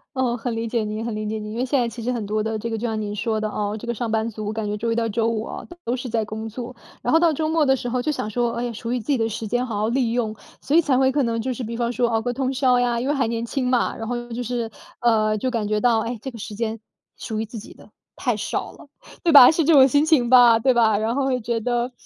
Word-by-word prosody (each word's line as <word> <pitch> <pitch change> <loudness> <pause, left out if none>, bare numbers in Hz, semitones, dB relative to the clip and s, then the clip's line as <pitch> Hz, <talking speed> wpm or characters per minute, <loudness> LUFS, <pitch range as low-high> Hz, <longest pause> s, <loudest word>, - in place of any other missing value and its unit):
哦， 255 -2 +1
很 245 0 -3
理 230 0 -2
解 230 0 -1
您， 215 +1 -4
很 230 -2 -3
理 215 0 -4
解 215 +1 -2
您， 210 0 -6
因 - - -5
为 250 - 0
现 270 +1 +1
在 240 - +1
其 230 0 -7
实 250 - -1
很 235 -4 -3
多 215 +1 -1
的 220 0 -2
这 230 - -4
个 225 - -2
就 225 - -4
像 220 -2 -2
您 205 -1 -4
说 220 +1 -1
的， 215 0 -2
哦， 210 0 -3
这 235 - -9
个 235 - -1
上 230 0 -3
班 220 +1 0
族， 215 -1 -5
感 220 0 -3
觉 205 - -2
周 230 +2 -2
1 - - 0
到 230 0 0
周 225 +1 0
5 225 -1 -2
哦， - - -7 0.2
都 240 - 0
是 255 0 -5
在 225 -1 0
工 220 +1 -6
作， 245 +2 -7 0.3
然 245 - 0
后 320 - +6
到 335 -1 +4
周 310 +1 -1
末 320 -1 +2
的 265 -1 +3
时 245 - -5
候 245 +1 -1
就 305 - 0
想 215 - -3
说， 240 +1 0
哎， 240 0 -3
属 230 +2 -5
于 250 - 0
自 220 - -12
己 285 - +2
的 225 -1 0
时 220 0 -5
间 245 +3 0
好 220 -5 -3
好 215 - +1
利 235 -1 +1
用， 225 -3 -1 0.3
所 290 - 0
以 335 - +7
才 285 -5 +1
会 265 0 +3
可 290 - +2
能 230 -1 -1
就 255 +2 -2
是 250 - -6
比 230 +1 -5
方 240 0 -1
说 240 0 +1
熬 225 -1 +1
个 245 +2 -2
通 265 +1 -1
宵 255 -1 +3
呀， 240 -1 +1
因 250 - -2
为 290 - +2
还 270 -3 +1
年 230 0 -2
轻 255 +2 -2
嘛， 245 -2 +1
然 225 - -6
后 240 +1 -4
就 245 +1 -3
是 235 -1 -3 0.3
呃， 215 -3 +2
就 255 +5 -1
感 230 -4 -2
觉 215 - +1
到， 230 0 +3
哎， 230 +1 -4
这 265 - -5
个 240 - -10
时 210 -1 -7
间 225 0 -3 0.4
属 220 -1 -4
于 220 - -2
自 225 +2 -9
己 215 - -10
的 - - -18 0.3
太 - - 0
少 - - -3
了， - - -15 0.4
对 335 - +3
吧？ 265 -4 +11
是 325 +1 +2
这 330 - +5
种 270 -2 +8
心 285 +3 +3
情 290 -7 +3
吧， 240 -2 +7
对 260 +3 +3
吧？ 220 -3 +3
然 220 +3 -1
后 275 -1 0
会 260 -2 0
觉 230 +1 -1
得 240 +2 -1
235 Hz, 335 characters per minute, -22 LUFS, 220-250 Hz, 0.4 s, 吧